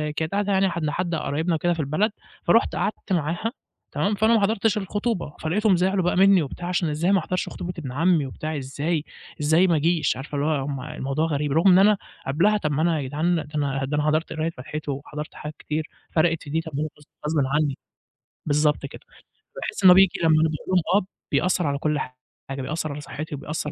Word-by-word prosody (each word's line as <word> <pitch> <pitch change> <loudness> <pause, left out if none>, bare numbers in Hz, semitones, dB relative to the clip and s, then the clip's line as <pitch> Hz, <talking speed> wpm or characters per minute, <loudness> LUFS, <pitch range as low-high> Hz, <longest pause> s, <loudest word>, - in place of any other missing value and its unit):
كانت 160 0 -2
قاعدة 205 0 0
يعني 195 0 +3
حد 170 -2 -3
لحد 170 +3 -1
قرايبنا 160 +2 -1
وكده 175 +2 +1
في 165 - -7
البلد، 155 +9 +1 0.3
فرُحت 230 - +3
قعدت 205 -2 -2
معاها، 170 +7 -1 0.4
تمام، 205 +1 0
فأنا 220 +3 +3
ما 220 - +3
حضرتش 215 +1 +2
الخطوبة، 205 -4 -2
فلقيتهم 195 +5 +2
زعلوا 185 +1 +1
بقى 175 - +1
منّي 195 -1 +6
وبتاع 165 +4 -5
عشان 180 -2 0
إزاي 160 +5 +1
ما 195 - +4
احضرش 185 +2 -2
خطوبة 180 0 -5
إبن 135 -6 -6
عمي 165 +1 +2
وبتاع 155 +4 -4
إزاي؟! 145 +4 -2 0.4
إزاي 160 +5 +4
ما 170 - +3
اجيش؟! 160 0 +1
عارفة 140 +2 -7
اللي 145 +2 0
هو 155 - +2
هُم 140 -2 -4
الموضوع 150 +1 -2
غريب، 150 -1 -1
رغم 165 +7 +3
إن 180 - +7
أنا 205 +1 +5 0.3
قبلها 180 +10 +3
طب 155 -7 -2
ما 145 +1 0
أنا 165 -2 +2
يا 135 - -4
جدعان 160 +6 +1
ده 155 -3 -3
أنا 135 -2 0
ده 150 - -2
أنا 150 - +1
حضرت 155 +2 +1
قراية 160 +1 -1
فاتحته 150 +1 -6
وحضرت 150 +2 -6
حاجات 150 0 -7
كتير، 155 +1 -3 0.2
فرَقِت 165 0 +2
في - - -10
دي؟ 160 +3 0
طب 160 - -9
ما 150 - 0
هو - - -1
غص 150 - -18 0.2
غصبٍ 155 - 0 0.2
عنّي، 150 -3 +1 0.7
بالضبط 150 -1 +2
كده، 140 - -11 0.6
فباحس 470 - -4
إن 185 - +10
هو 180 - +9
بييجي 190 -1 +4
لمّا 160 - +5
أنا 160 - +4
باقول 155 - -4
لهم 185 -2 +3 0.2
آه، - - -14 0.3
بيأثّر 180 -2 +2
على 140 0 0
كلّ 150 +1 0 0.5
حاجة، 135 0 -4
بيأثّر 155 +3 -3
على 145 - -6
صحّتي 155 +1 -6
وبيأثّر 150 +1 -4
160 Hz, 220 wpm, -24 LUFS, 150-180 Hz, 0.7 s, إن